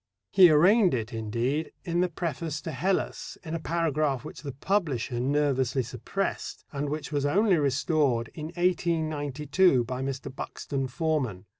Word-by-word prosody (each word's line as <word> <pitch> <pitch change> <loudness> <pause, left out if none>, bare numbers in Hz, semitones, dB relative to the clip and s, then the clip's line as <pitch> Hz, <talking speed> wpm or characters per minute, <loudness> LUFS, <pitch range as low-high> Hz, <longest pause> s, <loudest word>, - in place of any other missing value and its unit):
He 185 -3 +8
arraigned 180 - +5
it, 115 -1 -4
indeed, 120 +8 -2
in 170 -1 0
the 180 0 +2
preface 160 -2 -3
to 160 - -5
Hellas 185 +7 -2
in 160 -2 -6
a 165 - -1
paragraph 155 -5 0
which - - -8
the 145 -2 -5
publisher 140 - -1
nervously 135 -1 +1
suppressed, 125 - -4
and 145 -1 -3
which 150 +1 -4
was 145 -2 0
only 190 +6 +3
restored 140 -3 +1
in 155 -1 -6
1892 160 -4 +1
by 125 +2 -4
Mr. 135 -1 -4
Buxton 135 -1 -4
Forman. 130 - -1
150 Hz, 145 wpm, -27 LUFS, 130-170 Hz, -, He